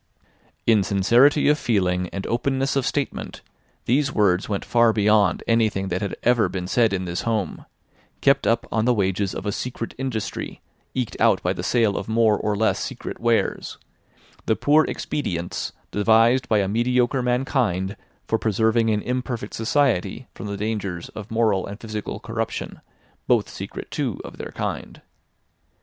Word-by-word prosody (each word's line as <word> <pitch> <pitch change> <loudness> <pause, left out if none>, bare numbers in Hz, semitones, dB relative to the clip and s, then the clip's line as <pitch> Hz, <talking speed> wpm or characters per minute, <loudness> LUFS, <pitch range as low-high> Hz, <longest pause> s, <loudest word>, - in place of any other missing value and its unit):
In 110 -3 +5
sincerity 115 +10 +4
of 150 +1 +4
feeling 90 -5 0
and 100 - -5
openness 135 +3 0
of 135 -3 +1
statement, 145 -2 -3 0.4
these 135 +3 +2
words 100 -5 +2
went 100 -2 -2
far 115 -1 +4
beyond 105 -3 +3
anything 110 -4 +1
that 90 +1 -2
had 100 - -3
ever 120 -2 +3
been 90 -2 -4
said 115 +2 +3
in 95 -1 -2
this 90 0 -3
home, 110 -4 -2 0.5
kept - - +3
up - - +2
on 110 0 +1
the 125 0 +3
wages 95 -1 0
of - - -5
a 105 - 0
secret 115 +1 -4
industry 125 -6 -4 0.4
eked 125 -4 -2
out - - +4
by - - +1
the - - -5
sale 115 -5 +2
of 100 - -4
more 110 -1 +4
or 105 0 -1
less 110 +1 +2
secret - - -6
wares: 115 -1 0 0.7
the 110 - +3
poor 150 +5 +4
expedients 90 - -3 0.2
devised 115 +5 +3
by 105 -2 +4
a 95 - 0
mediocre 125 +4 +1
mankind 125 -7 0 0.3
for 115 - 0
preserving 110 +1 +2
an 105 -1 0
imperfect 125 -3 -3
society 120 -1 0
from - - -7
the 100 0 -4
dangers 100 -5 -3
of 105 0 -9
moral 110 -4 +1
and 100 +2 -8
physical 110 -2 -5
corruption, 115 -1 -4 0.5
both - - +3
secret - - -8
too - - -2
of - - -10
their - - -6
kind. - - -5
110 Hz, 160 wpm, -23 LUFS, 100-120 Hz, 0.7 s, In